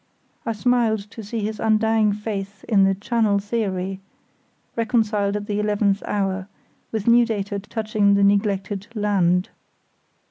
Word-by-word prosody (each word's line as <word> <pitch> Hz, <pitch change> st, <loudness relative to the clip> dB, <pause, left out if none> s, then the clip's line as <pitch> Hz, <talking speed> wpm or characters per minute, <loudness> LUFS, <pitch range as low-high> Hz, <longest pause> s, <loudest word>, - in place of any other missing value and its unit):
I 230 Hz, -, +1 dB
smiled 225 Hz, -1 st, +1 dB
to 225 Hz, -, -8 dB
see 220 Hz, +2 st, -4 dB
his 215 Hz, +1 st, -3 dB
undying 220 Hz, -1 st, +3 dB
faith 200 Hz, -2 st, -5 dB
in 200 Hz, -4 st, +3 dB
the 195 Hz, 0 st, +2 dB
"channel 210 Hz, 0 st, +1 dB
theory" 195 Hz, -3 st, -2 dB, 0.8 s
reconciled 215 Hz, -3 st, +1 dB
at 205 Hz, 0 st, -3 dB
the 205 Hz, 0 st, -2 dB
eleventh 205 Hz, -1 st, +1 dB
hour, 195 Hz, -2 st, -1 dB, 0.4 s
with 220 Hz, -2 st, -3 dB
new 240 Hz, +1 st, +6 dB
data 205 Hz, -3 st, -2 dB
touching 210 Hz, -1 st, +1 dB
the 200 Hz, -, +3 dB
neglected 200 Hz, 0 st, +1 dB
"land". 190 Hz, -4 st, +2 dB
205 Hz, 135 wpm, -22 LUFS, 200-220 Hz, 0.8 s, new